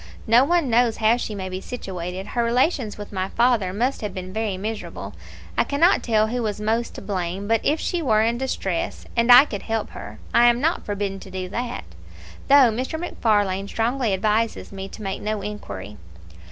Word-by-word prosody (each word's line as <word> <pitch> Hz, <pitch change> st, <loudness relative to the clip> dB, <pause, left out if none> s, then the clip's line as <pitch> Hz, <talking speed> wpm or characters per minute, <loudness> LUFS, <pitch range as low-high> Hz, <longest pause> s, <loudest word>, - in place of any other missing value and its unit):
"No 235 Hz, +3 st, +6 dB
one 340 Hz, 0 st, +2 dB
knows 235 Hz, -1 st, +3 dB
how 220 Hz, +1 st, +4 dB
she 220 Hz, -3 st, -4 dB
may 190 Hz, -1 st, -4 dB
be 185 Hz, 0 st, -5 dB
situated 190 Hz, -4 st, -6 dB
her 240 Hz, -, 0 dB
relations 245 Hz, -1 st, +1 dB
with 205 Hz, 0 st, -9 dB
my 190 Hz, 0 st, -2 dB
father 235 Hz, -6 st, +2 dB
must 245 Hz, +8 st, -1 dB
have 210 Hz, -, -4 dB
been 185 Hz, 0 st, -6 dB
very 215 Hz, -3 st, -2 dB
miserable. 215 Hz, +3 st, -5 dB, 0.4 s
I -, -, +3 dB
cannot 325 Hz, +6 st, +3 dB
tell 215 Hz, -2 st, +2 dB
who 245 Hz, +3 st, -2 dB
was 210 Hz, -2 st, -2 dB
most 225 Hz, +2 st, -1 dB
to -, -, -8 dB
blame 190 Hz, 0 st, -3 dB
but 225 Hz, +1 st, +2 dB
if 305 Hz, +2 st, +1 dB
she 350 Hz, -, -1 dB
were 220 Hz, -7 st, +3 dB
in 235 Hz, +1 st, 0 dB
distress, 195 Hz, -9 st, -3 dB
and 235 Hz, +1 st, +4 dB
I 250 Hz, +4 st, +10 dB
could 205 Hz, -9 st, -5 dB
help 225 Hz, -1 st, -3 dB
her, -, -, -9 dB, 0.2 s
I 240 Hz, 0 st, +6 dB
am 240 Hz, 0 st, +4 dB
not 320 Hz, +6 st, 0 dB
forbidden 200 Hz, -1 st, -2 dB
to 190 Hz, -, -11 dB
do 185 Hz, 0 st, -4 dB
that, 240 Hz, +4 st, -4 dB, 0.6 s
though 275 Hz, -4 st, +7 dB
Mr. 260 Hz, +8 st, -3 dB
MacFarlane 205 Hz, -, 0 dB
strongly 235 Hz, +2 st, 0 dB
advises 215 Hz, +4 st, 0 dB
me 195 Hz, -1 st, -6 dB
to 215 Hz, -, -10 dB
make 195 Hz, -1 st, -3 dB
no 210 Hz, -1 st, -2 dB
inquiry." 105 Hz, -, -7 dB
220 Hz, 195 wpm, -23 LUFS, 195-245 Hz, 0.6 s, I